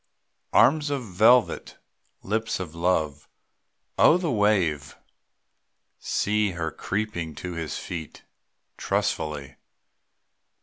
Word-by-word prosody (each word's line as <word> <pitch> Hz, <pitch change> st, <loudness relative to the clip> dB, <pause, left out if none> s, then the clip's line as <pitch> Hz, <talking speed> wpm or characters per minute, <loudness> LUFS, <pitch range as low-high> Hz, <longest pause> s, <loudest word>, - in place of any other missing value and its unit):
Arms 155 Hz, -2 st, +4 dB
of 140 Hz, -3 st, -2 dB
velvet, 110 Hz, +6 st, +3 dB, 0.5 s
lips 110 Hz, +2 st, -1 dB
of 90 Hz, -4 st, -6 dB
love, 80 Hz, -4 st, -1 dB, 0.7 s
Oh! 165 Hz, -, +7 dB
the 175 Hz, -4 st, -2 dB
wave. 90 Hz, -, +1 dB, 1.0 s
See 105 Hz, -1 st, 0 dB
her 85 Hz, -1 st, -3 dB
creeping 95 Hz, -6 st, -4 dB
to 90 Hz, +4 st, -6 dB
his 80 Hz, -2 st, -4 dB
feet 80 Hz, -4 st, -7 dB, 0.5 s
Trustfully. 75 Hz, -3 st, -2 dB
90 Hz, 90 wpm, -25 LUFS, 80-110 Hz, 1.0 s, Oh